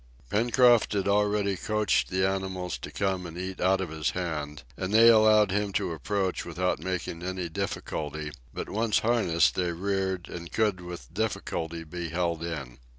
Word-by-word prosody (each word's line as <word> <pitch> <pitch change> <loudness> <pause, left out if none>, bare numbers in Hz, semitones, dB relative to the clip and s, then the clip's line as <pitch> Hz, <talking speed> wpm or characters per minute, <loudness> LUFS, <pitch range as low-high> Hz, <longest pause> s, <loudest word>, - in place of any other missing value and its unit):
Pencroft 120 +1 +4
had 100 -1 0
already 100 0 +2
coaxed 105 +2 +1
the 95 +1 +2
animals 95 -2 -2
to - - -7
come 95 -3 -1
and 85 +1 -9
eat 95 +1 -5
out 95 +1 +3
of 90 -4 -4
his 80 -1 -1
hand, 75 -5 -4
and 95 +6 -3
they 115 +2 +8
allowed 110 -3 +6
him 100 +1 0
to - - 0
approach 95 +5 -1
without 90 +2 -1
making 90 -2 -4
any 90 0 -3
difficulty, 75 -1 -4 0.2
but - - -5
once 110 0 +1
harnessed 110 -8 +3
they 90 -1 0
reared 95 0 -2
and 85 -2 -8
could 105 -3 +1
with 85 -6 -9
difficulty 85 -5 -2
be 85 +1 -5
held 85 -1 -1
in. 70 -7 -5
95 Hz, 165 wpm, -28 LUFS, 85-100 Hz, 0.2 s, they